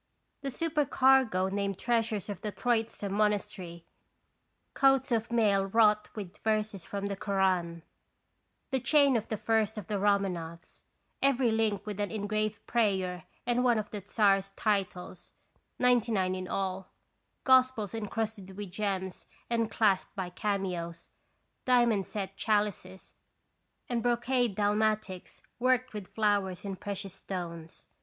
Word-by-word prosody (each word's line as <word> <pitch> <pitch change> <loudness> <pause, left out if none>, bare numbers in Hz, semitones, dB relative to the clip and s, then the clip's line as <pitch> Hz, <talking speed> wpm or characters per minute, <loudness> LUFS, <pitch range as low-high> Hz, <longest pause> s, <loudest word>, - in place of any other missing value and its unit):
The 275 - -3
supercargo 265 - +3
named 200 -1 -2
treasures 225 -4 0
of 205 -3 -6
the 210 - -3
Troitsa 225 0 -1
monastery: 195 -4 -1 0.9
coats 270 -1 +3
of 230 0 0
mail 205 -4 +3
wrought 210 0 +3
with 200 -2 -7
verses 215 -3 -1
from 200 +2 -4
the 200 0 -2
Koran; 185 -4 0 0.9
the 265 - +1
chain 280 +1 +4
of 225 -2 -1
the 215 - -2
first 220 0 +1
of 210 - -5
the 205 0 -2
Roman 200 -2 +2
offs, 170 +1 -9 0.4
every 265 -3 +3
link 215 -3 0
with 210 -1 -5
an 205 - -1
engraved 215 0 -2
prayer 190 -6 0 0.2
and 245 +1 +1
one 240 -2 +4
of 210 -1 -3
the 210 - -5
Czar's 195 -2 +2
titles, 190 -4 -2 0.4
ninety 245 -2 +3
nine 185 -3 +1
in 185 0 -4
all; 190 -1 -3 0.5
Gospels 255 -6 +4
encrusted 210 -3 -4
with 205 -3 -6
gems 190 -2 -3 0.2
and 230 -1 +1
clasped 205 -4 +1
by 185 -3 -4
cameos; 180 -4 -3 0.5
diamond 240 -6 +3
set 195 -2 -5
chalices; 205 -3 -1 0.7
and 240 -1 -1
brocade 240 -1 +1
dalmatics 210 -2 -1 0.2
worked 255 0 +2
with 205 -3 -8
flowers 205 -4 +1
in 195 -1 -3
precious 195 -1 -6
stones. 170 -4 -7
210 Hz, 135 wpm, -30 LUFS, 190-230 Hz, 0.9 s, chain